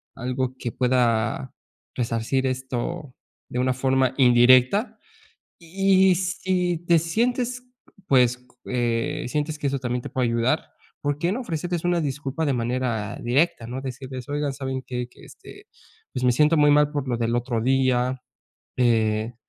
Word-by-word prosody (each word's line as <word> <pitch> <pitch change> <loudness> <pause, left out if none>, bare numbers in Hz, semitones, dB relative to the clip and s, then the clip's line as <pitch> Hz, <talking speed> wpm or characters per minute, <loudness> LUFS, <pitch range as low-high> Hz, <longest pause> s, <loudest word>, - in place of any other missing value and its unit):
algo 130 +1 -3
que 120 - -4
pueda 125 0 0 0.4
resarcir 115 +2 -1
esto 130 +3 -4 0.4
de 125 - -3
una 130 0 +2
forma 130 0 +1
indirecta. 130 - +5 0.6
Y 190 +2 +3
si 180 -1 -1
te 170 -1 +5
sientes, 245 +8 -1 0.4
pues, 125 -2 +3 0.2
eh, 120 -2 -1
sientes 150 +2 -2
que 145 - -1
eso 140 0 -1
también 125 -1 -2
te - - -7
puede 130 -2 0
ayudar, 115 +6 +1 0.4
¿por 145 0 -1
qué 170 +3 0
no 230 - -2
ofrecerles 175 -4 -3
una 175 -1 +2
disculpa 145 +1 -3
de 145 - +1
manera 120 -3 -2
directa, 120 -1 +1
¿no? 125 +2 -5
Decirles: 130 -1 -7
"Oigan, 145 0 -1
¿saben 130 -1 -4
qué?, 125 -1 -4
que, - - -19
este, - - -14 0.5
pues, 125 - -3
me 125 - +5
siento 150 +5 +3
muy 145 -1 +5
mal 150 0 +4
por 145 -3 -3
lo 125 - 0
del 115 0 -1
otro 120 -1 -1
día, 130 0 +1 0.6
eh, 110 -2 +1
130 Hz, 150 wpm, -24 LUFS, 125-155 Hz, 0.6 s, indirecta